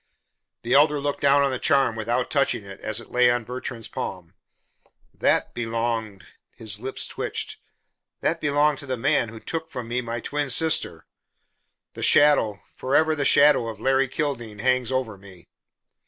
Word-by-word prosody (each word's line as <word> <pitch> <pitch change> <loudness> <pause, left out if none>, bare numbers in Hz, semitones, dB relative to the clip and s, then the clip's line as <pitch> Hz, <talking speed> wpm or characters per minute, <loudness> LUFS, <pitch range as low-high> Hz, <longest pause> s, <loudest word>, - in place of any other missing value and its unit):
The 120 - -1
Elder 145 +1 +4
looked 145 0 -3
down 140 0 +4
on 140 - +1
the 130 - -3
charm 135 -6 +2
without 120 +3 -2
touching 125 -7 0
it, 95 0 -11
as 110 +1 -3
it 115 - -13
lay 125 0 +4
on 120 -1 0
Bertrand's 120 -1 -7
palm. 90 -3 -6 0.8
"That - - +1
belonged 115 -4 -3 0.2
" - - -41
his 105 -3 -2
lips 130 +3 -3
twitched - - -4 0.6
"that 165 0 -1
belonged 145 0 +2
to 140 - -10
the 130 -1 -2
man 135 -1 +1
who 110 0 -10
took 160 +6 -5
from 125 -6 -7
me 120 +2 -2
my 120 0 -5
twin 145 +4 -3
sister. 160 +5 +1 0.9
The - - -9
shadow 130 -9 +4
forever 155 +4 +1
the 145 -2 -2
shadow 140 -5 +5
of 110 -2 -7
Larry 135 +2 +2
Kildene 125 -6 -4
hangs 130 0 +1
over 125 -6 -2
me." 95 -3 -15
125 Hz, 170 wpm, -24 LUFS, 115-145 Hz, 0.9 s, shadow